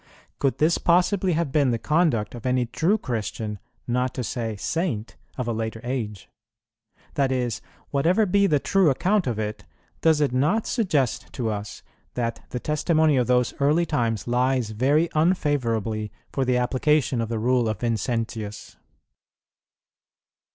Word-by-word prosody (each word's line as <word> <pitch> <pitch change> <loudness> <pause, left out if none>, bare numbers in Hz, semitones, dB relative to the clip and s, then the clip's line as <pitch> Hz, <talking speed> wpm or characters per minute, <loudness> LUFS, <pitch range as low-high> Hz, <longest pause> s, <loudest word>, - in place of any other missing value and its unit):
[18:3] - - -52
Could 135 -2 +1
this 160 +3 +3
possibly 180 +2 +2
have 160 -3 -1
been 145 -3 +3
the 120 - +1
conduct 150 -6 +1
of 120 - -9
any 125 -1 +2
true 155 - +1
Christian, 110 - -4 0.3
not 125 +1 0
to 125 - -2
say 115 0 -3
Saint, 120 - -2 0.2
of 125 -2 -3
a 115 - 0
later 110 0 -3
age? 110 -6 -4 0.9
that 135 -2 +1
is, 125 -3 -1 0.3
whatever 175 +10 +3
be 200 +1 +3
the 150 - +3
true 185 +4 +3
account 185 +8 +1
of 120 -3 -1
it, 105 -1 -4 0.4
does 160 -2 +4
it 145 -4 +1
not 155 - +2
suggest 155 - 0
to 115 -4 -2
us 105 0 -6 0.3
that 115 -1 -2
the 125 - -4
testimony 155 +1 +2
of 125 -2 +2
those 125 -1 +2
early 150 +5 +3
times 115 - -1
lies 125 -1 +1
very 140 +9 +2
unfavourably 120 - 0 0.2
for 135 - 0
the 125 0 +2
application 130 +1 +1
of 115 - -3
the 115 - -2
rule 120 +1 +2
of 110 -3 -4
Vincentius? 115 -2 -3
125 Hz, 155 wpm, -24 LUFS, 115-155 Hz, 0.9 s, does